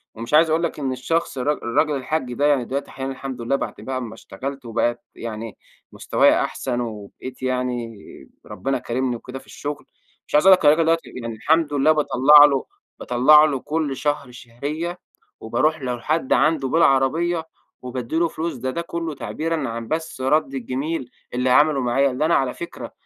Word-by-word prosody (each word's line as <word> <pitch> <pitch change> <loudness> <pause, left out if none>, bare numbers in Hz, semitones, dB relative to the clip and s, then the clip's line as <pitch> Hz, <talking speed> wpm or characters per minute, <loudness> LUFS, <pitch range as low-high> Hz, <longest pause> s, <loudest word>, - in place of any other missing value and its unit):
ومش 115 +5 -7
عايز 160 +1 +6
أقول 160 +2 +1
لك 160 - -2
إن 135 -2 -1
الشخص 160 +4 -2
الر 145 +4 +1
الراجل 150 +3 0
الحاج 130 -1 -2
ده 145 +4 0
يعني 140 -5 +3
دلوقتي 140 +3 -4
أحيانًا 135 0 -5
الحمد 130 -2 -6
لله 130 +4 0
بعد - - -3
بقى 130 -1 -4
اما 115 -3 -5
اشتغلت 135 +5 -7
وبقى 120 +1 -1
يعني 115 -1 -7 0.3
مستوايا - - +3
أحسن، 125 -2 -3
وبقيت 115 +3 -8
يعني 125 -3 -2 0.5
ربنا 135 0 -2
كارمني 125 +1 -2
وكده 125 +3 -8
في 130 - -20
الشغل، 145 0 -6 0.4
مش - - -3
عايز 150 - +4
أقول 190 - +10
لك 160 - -4
الراجل 155 +2 +5
دوّة 165 0 +4 0.2
يعني 115 -1 -5
الحمد 155 +5 +1
لله 145 +2 +4
باطّلع 150 -1 +7
له 140 -2 +1 0.3
باطّلع 150 +5 +6
له 140 -4 -1
كل 150 -2 -2
شهر 145 -4 -2
شهرية، 145 +9 -5 0.4
وباروح 145 +7 0
له 125 -1 -2
لحد 150 +3 0
عنده 145 +1 +2
بالعربية 160 +3 +2 0.3
وبادّي 125 +2 -5
له 170 0 +3
فلوس 165 +1 -4
ده 130 +1 -3
ده 170 - -3
كلّه 165 -2 -4
تعبيرًا 155 -2 -3
عن 115 0 -5
بس 160 -4 -4
رد 135 +1 +1
الجميل 130 +2 -3 0.2
اللي 125 +1 0
عمله 145 +1 +4
معايا، 135 +3 +2
اللي 140 +5 -1
أنا 170 - +3
على 130 -2 +1
فكرة 170 - -8
135 Hz, 180 wpm, -22 LUFS, 125-155 Hz, 0.5 s, أقول